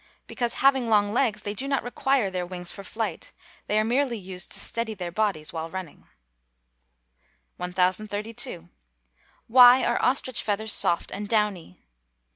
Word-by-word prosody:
_ - - -32 0.2
Because, 240 -2 -3
having 265 -3 +2
long 205 -1 +2
legs, 220 -5 0
they 205 - -3
do 260 +6 -3
not 275 -1 0
require 245 -3 0
their 180 -1 -3
wings 180 -1 -2
for 200 - -9
flight; 220 +3 -5 0.3
they 210 - 0
are 215 - +3
merely 245 +1 0
used 185 -2 -5
to - - -1
steady 230 -2 -1
their 180 -3 -6
bodies 190 -6 -2
while 165 0 -5
running. 185 -3 -9 1.5
1032. 185 0 -1 0.8
_Why 250 +2 +7
are 240 - 0
ostrich 255 -1 +1
feathers 215 +1 0
soft 170 - +1
and 205 +1 -6
downy? 210 - -2
210 Hz, 150 wpm, -25 LUFS, 185-235 Hz, 1.5 s, Why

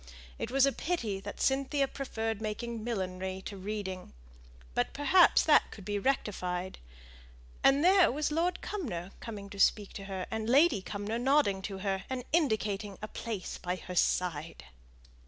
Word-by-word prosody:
It - - -3
was 270 +1 +4
a 275 - +3
pity 240 - -2
that 205 +1 -8
Cynthia 275 +1 +1
preferred 225 -6 -3
making 225 +1 -4
millinery 190 -4 -3
to 205 - -6
reading; 190 -2 -5 0.6
but - - 0
perhaps 335 +5 +5
that 305 - +5
could 200 - -11
be 205 0 -1
rectified. 190 -7 -1 0.8
And 275 +4 +5
there 375 -1 +6
was 300 +3 -1
Lord 345 +3 0
Cumnor 195 - -4
coming 210 -4 -7
to 200 - -9
speak 205 0 +3
to 195 - -7
her, 190 -2 -4
and 220 0 -2
Lady 280 - +5
Cumnor 205 +4 -3
nodding 260 -7 +3
to 195 - -6
her, 195 -1 0
and 260 -1 -3
indicating 210 - 0
a 215 - -5
place 220 -4 -5
by 180 0 -2
her 180 0 -8
side. 165 -3 0
215 Hz, 155 wpm, -31 LUFS, 195-275 Hz, 0.8 s, there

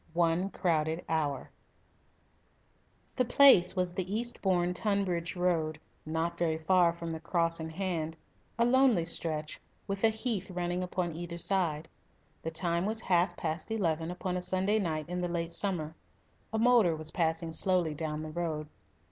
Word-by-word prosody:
ONE 170 +2 +2
CROWDED 160 -3 0
HOUR 150 -4 -1 1.7
The 255 - +4
place 245 -7 +6
was 180 -1 0
the 185 +1 -3
Eastbourne 185 -7 0
Tunbridge 185 -4 -1
road, 165 -4 0 0.3
not 165 +2 -2
very 160 -2 +1
far 175 +1 +4
from 170 0 -6
the 160 - -4
Cross 165 0 0
in 160 0 -4
Hand 165 -2 -3 0.4
a 235 - +3
lonely 250 -8 +4
stretch, 155 -2 -3 0.2
with 195 0 -4
a 225 - +7
heath 220 -3 -2
running 175 0 -2
upon 180 -2 -2
either 170 0 -6
side. 170 -4 0 0.5
The 165 - -3
time 170 +2 0
was 220 +1 -2
half 180 -1 +1
past 160 +4 -3
eleven 165 -7 -1
upon 180 0 -3
a - - -2
Sunday 190 +4 +1
night 155 -5 -2
in 180 +1 -3
the 175 - -1
late 170 -1 -2
summer. 170 -3 -1 0.6
A 220 - -1
motor 225 -7 +4
was 155 0 -7
passing 165 -1 -1
slowly 175 -1 +1
down 155 0 -4
the 155 - -6
road. 155 -2 -3
175 Hz, 155 wpm, -30 LUFS, 160-190 Hz, 1.7 s, a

